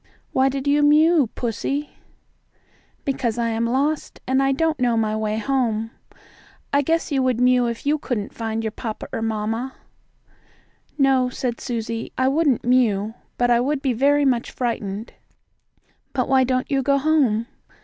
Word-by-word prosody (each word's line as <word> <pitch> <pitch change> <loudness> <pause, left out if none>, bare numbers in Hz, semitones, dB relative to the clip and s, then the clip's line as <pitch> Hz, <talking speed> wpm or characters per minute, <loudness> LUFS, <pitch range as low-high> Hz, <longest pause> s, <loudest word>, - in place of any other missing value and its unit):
"Why 265 +1 +3
did 270 0 -4
you 290 +1 +3
mew, 300 -2 +5
pussie?" 250 +4 -2
asked 295 - -16
Susie. - - -32 1.1
"Because 265 -5 -1
I 235 -1 0
am 230 +1 0
lost, 280 +5 -1
and 265 +1 +2
I 270 0 +2
don't 315 +2 0
know 240 -2 +2
my 215 -1 0
way 215 0 -1
home. 225 -2 -1 0.8
I 285 - +4
guess 325 +3 0
you 275 -2 +2
would 255 -2 +1
mew 250 -1 +4
if 235 +2 -5
you 300 +2 +2
couldn't 220 -7 -3
find 225 -1 -3
your 220 - -2
papa 220 0 -6
or - - -2
mamma." 225 +3 -2 1.2
"No," 265 -3 +3
said 245 -1 -4
Susie, 230 -2 -4
"I 260 - +2
wouldn't 285 -4 +1
mew, 225 -4 +2 0.2
but 245 0 +2
I 235 - +5
would 275 +3 -1
be 265 -3 +1
very 285 +4 +3
much 250 -3 +1
frightened. 220 -3 -4 1.0
But 255 -3 0
why 265 -1 +4
don't 255 +1 -1
you 275 -1 +2
go 280 +1 +2
home?" 275 -7 +2
255 Hz, 170 wpm, -22 LUFS, 225-275 Hz, 1.2 s, mew